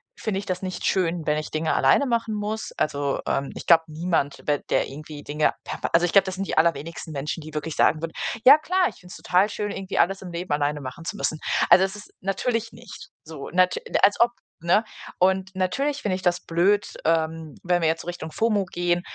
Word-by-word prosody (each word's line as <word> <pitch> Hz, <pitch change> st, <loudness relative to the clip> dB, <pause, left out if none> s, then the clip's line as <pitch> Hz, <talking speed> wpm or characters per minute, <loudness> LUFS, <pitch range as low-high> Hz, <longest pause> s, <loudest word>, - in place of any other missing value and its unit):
finde 215 Hz, -, -3 dB
ich 200 Hz, -, -7 dB
das 185 Hz, -2 st, -3 dB
nicht 185 Hz, -1 st, -5 dB
schön, 170 Hz, -3 st, 0 dB
wenn 150 Hz, +1 st, +1 dB
ich 155 Hz, -, -6 dB
Dinge 155 Hz, +1 st, -1 dB
alleine 285 Hz, -, +4 dB
machen 230 Hz, -3 st, -1 dB
muss. 210 Hz, +1 st, -3 dB
Also, 140 Hz, -2 st, -1 dB
ähm, 135 Hz, 0 st, -1 dB
ich -, -, -8 dB
glaube 165 Hz, -1 st, +6 dB
niemand 155 Hz, -2 st, -2 dB
ba 145 Hz, -1 st, +2 dB
der -, -, +2 dB
irgendwie 150 Hz, +1 st, -9 dB
Dinge 150 Hz, +1 st, +1 dB
per -, -, -6 dB
Also 170 Hz, +1 st, +5 dB
ich 175 Hz, -, -1 dB
glaube, 195 Hz, -1 st, +6 dB
das 190 Hz, -1 st, -4 dB
sind 195 Hz, +1 st, -3 dB
die -, -, -3 dB
allerwenigsten 165 Hz, 0 st, 0 dB
Menschen, 150 Hz, +4 st, -4 dB
die 155 Hz, 0 st, -10 dB
wirklich 155 Hz, +1 st, -4 dB
sagen 155 Hz, -, +3 dB
würden: 165 Hz, 0 st, -4 dB, 0.3 s
„Ja 275 Hz, +3 st, +10 dB
klar, 365 Hz, +3 st, +1 dB
ich -, -, -15 dB
find's 180 Hz, 0 st, -12 dB
total 185 Hz, +3 st, +2 dB
schön, 205 Hz, 0 st, -3 dB
irgendwie 195 Hz, -1 st, -5 dB
alles 195 Hz, +2 st, +2 dB
im 185 Hz, -, -8 dB
Leben 170 Hz, 0 st, -5 dB
alleine 145 Hz, 0 st, 0 dB
machen 130 Hz, +5 st, -8 dB
zu 210 Hz, -, -4 dB
müssen.“ 155 Hz, -5 st, -2 dB, 0.3 s
Also, 180 Hz, +2 st, +8 dB
es 195 Hz, +1 st, -6 dB
ist 210 Hz, -, -12 dB
natürlich 225 Hz, +4 st, -1 dB
nicht 235 Hz, +1 st, -11 dB, 0.2 s
so, 155 Hz, -3 st, -8 dB
nat 180 Hz, 0 st, +3 dB, 0.3 s
als 205 Hz, -, +5 dB
ob, 235 Hz, -, +6 dB, 0.3 s
ne? 175 Hz, +6 st, +3 dB, 0.3 s
Und 190 Hz, +1 st, +2 dB
natürlich 275 Hz, +11 st, -1 dB
finde 205 Hz, -, 0 dB
ich 185 Hz, -, -6 dB
das 175 Hz, 0 st, +1 dB
blöd, 195 Hz, +5 st, +2 dB
ähm, 160 Hz, -2 st, 0 dB
wenn 175 Hz, 0 st, +1 dB
wir 160 Hz, -, +3 dB
jetzt 165 Hz, +1 st, -1 dB
so -, -, -13 dB
Richtung 170 Hz, -2 st, -6 dB
FOMO 210 Hz, -1 st, +1 dB
gehen, 175 Hz, -1 st, 0 dB
175 Hz, 225 wpm, -24 LUFS, 160-195 Hz, 0.3 s, Ja